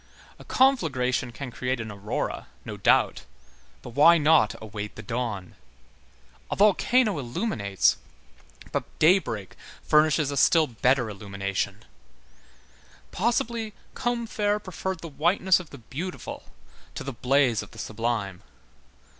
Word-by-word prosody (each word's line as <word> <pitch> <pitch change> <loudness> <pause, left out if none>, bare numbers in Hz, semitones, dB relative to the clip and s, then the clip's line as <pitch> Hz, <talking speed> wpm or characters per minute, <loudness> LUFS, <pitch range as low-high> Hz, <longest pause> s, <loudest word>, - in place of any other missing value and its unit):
A - - -11
conflagration 135 - +2
can 130 +1 -7
create 125 +1 -2
an 115 -1 -5
aurora, 100 +1 -4 0.2
no - - -5
doubt, - - +2 0.6
but 120 - -8
why 150 +7 +6
not 150 -7 +4
await 105 -1 -7
the 110 - -9
dawn? 115 -6 -4 1.0
A - - -2
volcano 210 - +3
illuminates, 120 - 0 0.7
but - - -1
daybreak 155 - +2 0.3
furnishes 150 -1 +3
a 140 - -3
still 160 +4 +5
better 125 0 +1
illumination. 100 0 -4 1.3
Possibly, 230 0 -1 0.2
Combeferre 225 -4 -1
preferred 190 -2 -5
the 170 - -6
whiteness 175 +5 +2
of 175 -4 -10
the 140 - -10
beautiful 150 +10 -7 0.5
to - - -5
the 135 - -5
blaze 125 -1 +2
of - - -10
the - - -16
sublime. 110 -4 -3
135 Hz, 120 wpm, -26 LUFS, 110-185 Hz, 1.3 s, why